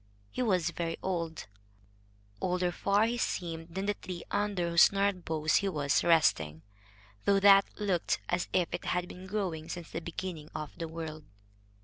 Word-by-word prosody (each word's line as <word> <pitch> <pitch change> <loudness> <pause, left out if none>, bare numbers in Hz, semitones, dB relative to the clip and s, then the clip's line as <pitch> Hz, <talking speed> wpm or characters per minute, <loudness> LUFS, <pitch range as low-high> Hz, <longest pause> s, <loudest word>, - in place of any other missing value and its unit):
He - - -3
was 180 -8 +2
very 165 -1 -3
old, 170 -4 -2 1.0
older 180 -1 +1
far 200 +4 +2
he 240 +1 -1
seemed 165 -4 -3
than 190 +1 -2
the 205 - +1
tree 180 -3 -7
under 205 -4 0
whose 170 +1 +7
gnarled 200 -2 0
boughs 160 -1 +2
he 200 - +1
was 145 -4 +1
resting, 80 - +3 0.6
though 200 -1 +4
that 195 0 +7
looked 195 -5 0
as 175 0 0
if 180 -2 +2
it 175 - -4
had 180 0 0
been 185 +1 -10
growing 185 -6 -3
since 175 -3 -6
the 165 - -4
beginning 165 -2 -6
of 150 -1 -5
the 165 -1 -4
world. 160 -2 -7
175 Hz, 165 wpm, -31 LUFS, 165-195 Hz, 1.0 s, whose